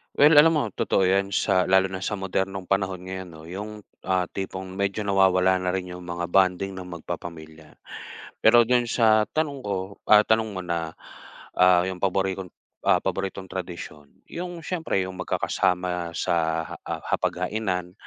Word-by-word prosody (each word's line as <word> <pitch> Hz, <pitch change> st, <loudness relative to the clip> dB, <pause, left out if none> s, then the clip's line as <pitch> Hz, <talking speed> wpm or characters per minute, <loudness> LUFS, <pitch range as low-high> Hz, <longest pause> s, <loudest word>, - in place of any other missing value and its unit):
Well 150 Hz, +2 st, +6 dB
alam 165 Hz, +2 st, +7 dB
mo, 150 Hz, -5 st, +1 dB
totoo 95 Hz, -, 0 dB
yan. 100 Hz, 0 st, +1 dB
Sa 95 Hz, -3 st, +2 dB
lalo 95 Hz, 0 st, +3 dB
na 95 Hz, -, -4 dB
sa 100 Hz, +2 st, -3 dB
modernong 95 Hz, -1 st, -3 dB
panahon 95 Hz, -2 st, 0 dB
ngayon 95 Hz, 0 st, -6 dB
'no. 80 Hz, -, -12 dB
Yung, 105 Hz, +3 st, -7 dB, 0.2 s
ah, 95 Hz, -1 st, 0 dB
tipong 95 Hz, -1 st, -5 dB
medyo 100 Hz, +2 st, -2 dB
nawawala 95 Hz, -2 st, +3 dB
na 90 Hz, 0 st, -1 dB
rin 90 Hz, -1 st, -3 dB
yung 90 Hz, 0 st, -9 dB
mga 85 Hz, 0 st, -4 dB
bonding 95 Hz, +1 st, +2 dB
ng 95 Hz, -1 st, -8 dB
magpapamilya. 80 Hz, -3 st, -8 dB, 0.7 s
Pero 120 Hz, +2 st, +6 dB
dun 120 Hz, 0 st, +2 dB
sa 110 Hz, -3 st, +3 dB
tanong 145 Hz, -3 st, -2 dB
ko, 100 Hz, -4 st, -2 dB, 0.3 s
ah, 105 Hz, 0 st, +7 dB
tanong 110 Hz, 0 st, +2 dB
mo 95 Hz, -3 st, -6 dB
na, 85 Hz, -2 st, -3 dB, 0.6 s
ah, 90 Hz, -1 st, +5 dB
yung 95 Hz, -1 st, -4 dB
paborikong, 95 Hz, -1 st, -1 dB, 0.4 s
ah, -, -, +5 dB
paboritong 95 Hz, -1 st, -3 dB
tradisyon, 85 Hz, -5 st, -7 dB, 0.2 s
yung 175 Hz, -1 st, -6 dB
siyempre 160 Hz, -, -1 dB
yung 95 Hz, 0 st, -7 dB
magkakasama 90 Hz, -2 st, -1 dB
sa -, -, 0 dB, 0.4 s
ha -, -, -6 dB
ah, -, -, -4 dB
hapaghainan. 90 Hz, -1 st, -1 dB
95 Hz, 160 wpm, -25 LUFS, 90-100 Hz, 0.7 s, alam